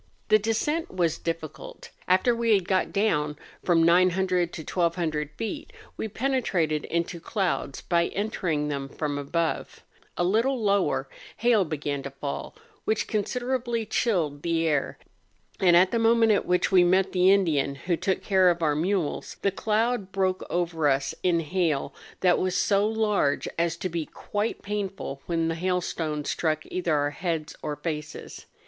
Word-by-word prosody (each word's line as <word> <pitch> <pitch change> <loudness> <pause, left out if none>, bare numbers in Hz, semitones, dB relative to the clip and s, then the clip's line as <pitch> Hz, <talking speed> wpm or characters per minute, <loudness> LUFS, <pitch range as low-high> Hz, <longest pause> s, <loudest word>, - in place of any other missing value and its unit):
The 215 0 +6
descent 225 +10 -1
was 175 -4 0
difficult. 165 -2 -6 0.2
After 185 +7 +3
we 230 -2 +3
had 190 -3 -1
got 190 -1 +1
down 150 -8 +1 0.3
from 170 -2 +3
900 180 +1 +3
to 160 - -7
1200 165 -4 -1
feet, 225 +7 -5 0.2
we - - -3
penetrated 200 - 0
into 170 +1 -2
clouds, 180 -6 -2
by 170 -1 +1
entering 180 -8 -2
them 140 -2 -3
from 145 0 -3
above: 160 +4 -2 0.3
a - - +1
little 230 +8 +2
lower, 200 -2 +1 0.3
hail 235 -4 +4
began 145 -2 -3
to 140 - -6
fall, 140 - -6 0.3
which 220 0 0
considerably 240 +2 -1
chilled 170 - 0
the 165 0 0
air, 145 -3 0 0.6
and 175 -2 +6
at 185 +1 +5
the 230 - +1
moment 225 0 +4
at 205 - +1
which 180 +2 +2
we 185 -2 +6
met 190 +2 +3
the 185 0 +4
Indian 155 -8 +2
who 170 +5 -1
took 190 +3 -1
care 190 -2 +4
of 170 -1 0
our 150 -2 +2
mules, 175 0 -1
the 200 - +3
cloud 215 0 0
broke 190 -1 0
over 170 -3 0
us 135 0 0
in 170 -2 +2
hail 160 -3 -1 0.3
that 180 -2 +4
was 185 0 0
so 200 +2 +3
large 215 -9 +1
as 170 0 0
to 185 - -2
be 165 -3 -3
quite 210 +2 -3
painful 195 -9 -4
when 165 -1 0
the 165 - 0
hailstones 165 -4 -2
struck 155 -2 0
either 175 -4 0
our 145 0 +1
heads 165 0 -3
or 150 -1 -3
faces. 150 0 -6
180 Hz, 160 wpm, -26 LUFS, 155-200 Hz, 0.6 s, The